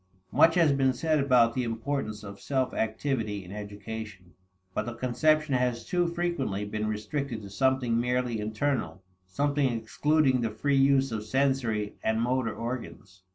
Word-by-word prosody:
Much 165 0 +5
has 165 -4 +5
been 135 -1 +2
said 155 +4 +1
about 125 -4 +4
the 130 - -1
importance 115 -2 -3
of 100 -1 -9
"self 130 -2 -1
activity" 110 -3 -2
in 90 - -11
education, 105 -3 -7 0.4
but 105 +4 -2
the 120 - -4
conception 150 +5 +2
has 125 -2 0
too 175 -2 +1
frequently 170 - -2
been 105 +1 -3
restricted 115 +2 -3
to 100 - -9
something 130 0 +1
merely 125 -1 0
internal 110 -2 -2 0.2
something 140 +6 +1
excluding 130 +4 +1
the 115 - 0
free 140 +7 0
use 135 -1 +4
of 110 -1 -3
sensory 115 -3 0
and 110 0 +1
motor 120 0 0
organs. 115 -6 -6
120 Hz, 155 wpm, -28 LUFS, 110-140 Hz, 0.4 s, Much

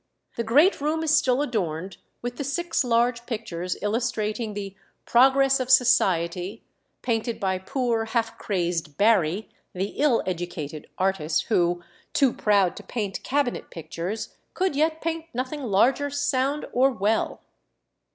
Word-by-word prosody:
The 235 - -1
great 290 - +4
room 310 +2 0
is 310 -1 +3
still 265 -1 +3
adorned 190 - -3 0.3
with 245 0 -4
the - - -3
six 330 +4 -1
large 235 0 +1
pictures 185 -7 -4
illustrating 215 -1 -1
the 195 -1 -5 0.3
"Progress 270 +2 +4
of 255 -1 -3
Society," 195 -6 +3 0.4
painted 230 -1 -1
by 190 -3 0
poor, 230 +2 -1
half 225 0 -1
crazed 170 -6 -2
Barry, 200 -2 +3 0.3
the 190 +2 -2
ill 285 -5 +3
educated 170 -4 -5
artist, 185 -5 0
who, 175 -4 +2 0.3
too 270 -4 +3
proud 200 -4 +2
to - - -8
paint 205 -5 -4
cabinet 275 -2 -1
pictures, 175 +6 -5 0.2
could 375 -5 0
yet 315 +2 +1
paint 325 0 -2
nothing 260 +4 -3
larger 255 +5 +2
sound 280 0 0
or 260 +2 +4
well. 220 -3 0
230 Hz, 135 wpm, -25 LUFS, 190-265 Hz, 0.4 s, great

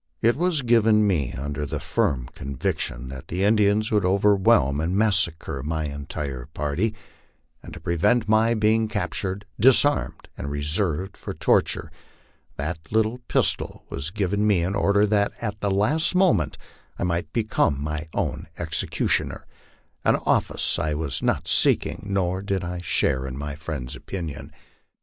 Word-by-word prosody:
It 115 +1 +3
was 170 -3 0
given 110 -3 +4
me 80 -11 0
under 70 +2 -4
the 70 - -3
firm 60 -4 -1
conviction 65 -1 -3
that 65 +3 -9
the 90 +3 -2
Indians 105 0 +3
would 105 -3 +2
overwhelm 95 - +3
and 90 +4 -1
massacre 85 -10 +1
my 80 +3 -2
entire 70 -3 -5
party; 85 +10 -1 0.7
and - - -11
to - - -9
prevent 105 +7 +1
my 110 +2 +3
being 110 +1 +2
captured, 100 -1 -3
disarmed, 135 +5 +4
and 70 - -5
reserved 80 +6 0
for - - -7
torture, - - +1 0.6
that 75 +4 -3
little 110 +3 +1
pistol - - 0
was 70 +4 -4
given 105 +1 0
me 95 -5 +3
in 90 +3 -1
order 100 +1 +3
that 100 -1 +1
at 105 -2 -4
the 100 - 0
last 115 - +1
moment 180 - +2 0.4
I - - -3
might 85 -2 -1
become 105 -10 +1
my 75 +2 -4
own - - -2
execution 80 -1 0
er - - -11 0.6
an - - +4
office - - +2
I 75 0 -1
was 75 -4 -2
not - - 0
seeking, - - +1
nor 95 -1 0
did 95 -2 -2
I 90 0 -4
share 65 -6 0
in 65 0 -6
my 70 +1 -4
friend's 75 -5 -6
opinion. 85 -7 -6
95 Hz, 150 wpm, -24 LUFS, 75-105 Hz, 0.7 s, given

